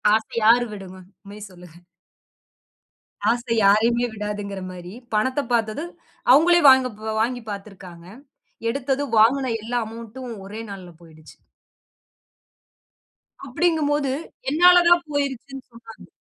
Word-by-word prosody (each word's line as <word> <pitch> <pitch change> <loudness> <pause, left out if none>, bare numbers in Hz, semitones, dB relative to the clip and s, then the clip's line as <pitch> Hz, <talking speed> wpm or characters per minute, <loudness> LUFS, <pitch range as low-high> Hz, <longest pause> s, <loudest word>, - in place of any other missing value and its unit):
ஆசை 220 - -4
யாரு 240 +2 +5
விடுவான்? 185 -2 -11 0.2
உண்மைய 205 +1 -11
சொல்லுங்க. 175 -2 -15 1.5
ஆசை 235 0 -1
யாரையுமே 225 +4 +3
விடாதுங்கிற 205 -2 -5
மாரி 180 0 -10 0.2
பணத்த 260 +6 +1
பாத்ததும் 235 +9 -2 0.4
அவங்களே 345 +5 +5
வாங்கப் 255 -5 +4 0.2
வாங்கி 245 +1 -1
பாத்துருக்காங்க. 190 -4 -10 0.6
எடுத்தது 275 +2 -2
வாங்குன 255 +4 +3
எல்லா 240 +3 -2
அமெளண்ட்ம் 230 +2 -9
ஒரே 210 +3 -8
நாள்ல 185 -3 -10
போயிடுச்சு. 155 -2 -17 2.1
அப்டிங்கும்போது 290 -1 0 0.4
என்னாதான் 350 +2 +5
போயிருச்சின்னு 275 -2 -4
சொன்னாங்க. 230 -1 -14
230 Hz, 95 wpm, -22 LUFS, 200-270 Hz, 2.1 s, யாரு